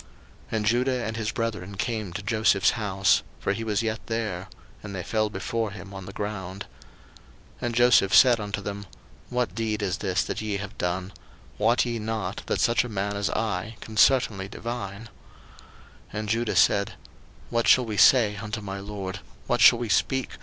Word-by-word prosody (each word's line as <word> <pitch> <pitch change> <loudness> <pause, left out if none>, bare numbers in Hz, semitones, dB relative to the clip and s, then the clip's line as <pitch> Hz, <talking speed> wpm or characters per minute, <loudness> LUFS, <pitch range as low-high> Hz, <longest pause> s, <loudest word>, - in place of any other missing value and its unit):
01:044:014 110 - -1
And 105 - -1
Judah 125 +2 +1
and 110 0 -3
his 110 -1 -2
brethren 105 -4 -3
came 110 -3 -2
to 100 +4 -6
Joseph's 105 -2 +3
house; 100 -4 +2 0.2
for 100 - 0
he 115 +3 -4
was 105 -1 0
yet 110 -1 -1
there: 105 -5 -3 0.3
and 100 -2 -7
they 90 - -4
fell 110 +3 0
before 110 +3 -2
him 100 -1 -10
on 95 -1 -8
the - - -7
ground. 100 -2 -5 0.9
01:044:015 - - -5
And 120 - -3
Joseph 120 -5 +5
said 125 -3 +7
unto 105 -1 -4
them, 100 0 -6 0.4
What 125 -7 -1
deed 110 -1 -2
is 95 -3 -1
this 95 -2 0
that - - -4
ye 105 -2 -2
have 105 +2 -7
done? 90 +2 -2 0.5
wot 115 +3 +3
ye 120 -1 -2
not 110 -3 -3
that - - 0
such 120 0 +3
a 125 - -6
man 100 -1 -2
as 100 0 -1
I 110 0 -2
can 110 - -10
certainly 105 -4 +3
divine? 105 -2 -6
01:044:016 115 - -10 1.1
And 105 0 -4
Judah 115 +1 0
said, 100 0 +3 0.6
What 115 -1 +1
shall 125 - +6
we 110 -2 -4
say 110 -5 +6
unto 105 +1 -4
my 100 -1 -6
lord? 100 -1 -6 0.3
what - - 0
shall - - +8
we 120 -1 -4
speak? 130 +3 +1
105 Hz, 190 wpm, -26 LUFS, 100-115 Hz, 1.1 s, shall